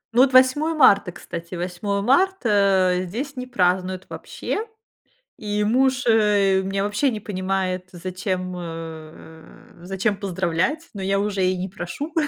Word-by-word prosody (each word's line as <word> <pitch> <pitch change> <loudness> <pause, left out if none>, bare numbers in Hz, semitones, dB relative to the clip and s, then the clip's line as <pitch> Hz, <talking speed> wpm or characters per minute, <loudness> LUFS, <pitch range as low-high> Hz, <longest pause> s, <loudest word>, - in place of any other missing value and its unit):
Ну 245 - +6
вот, 265 0 +5
8 260 +5 +4
марта, 200 -10 +5
кстати. 170 0 -8
8 185 +3 -2
марта, 205 - +3
э, 185 - -3
здесь 270 +10 -5
не 250 0 -6
празднуют 185 -4 0
вообще, 430 - -4 0.7
и 210 0 -2
муж, 255 +3 +2
э, 205 -4 +3
меня 195 +1 -2
вообще 205 +7 +1
не 220 -4 -3
понимает, 185 -2 -2
зачем, 185 +1 -4
э, 160 -1 -10
зачем 195 +4 -1
поздравлять, 190 - -1
но 200 - -7
я 195 +1 +1
уже 200 -2 -1
и 185 0 +1
не 185 +1 -3
прошу. 195 - -6
195 Hz, 140 wpm, -22 LUFS, 185-225 Hz, 0.7 s, Ну